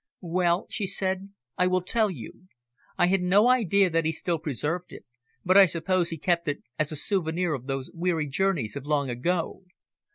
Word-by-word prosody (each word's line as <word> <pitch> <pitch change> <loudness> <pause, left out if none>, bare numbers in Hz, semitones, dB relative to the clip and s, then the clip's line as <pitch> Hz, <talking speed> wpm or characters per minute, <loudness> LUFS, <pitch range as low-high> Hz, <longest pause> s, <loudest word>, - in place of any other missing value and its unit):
"Well," 175 0 +2
she 200 - -2
said, 190 0 -1 0.3
"I 180 - +4
will 185 0 +1
tell 215 +3 +2
you. 170 - -10 0.5
I 175 - +4
had 190 +1 +2
no 195 +5 +4
idea 200 -6 +3
that 165 0 +1
he 160 - +1
still 165 +1 -2
preserved 155 +4 -3
it, - - -11 0.4
but 185 +2 +5
I 195 -1 +9
suppose 175 +1 0
he 165 - -4
kept 170 +1 0
it 145 - -3 0.2
as 155 0 0
a - - -3
souvenir 170 0 0
of 130 -2 -6
those 135 -1 -4
weary 170 -2 -1
journeys 145 - 0
of 140 0 -7
long 140 -3 0
ago. 165 +11 -2
175 Hz, 190 wpm, -26 LUFS, 155-185 Hz, 0.5 s, I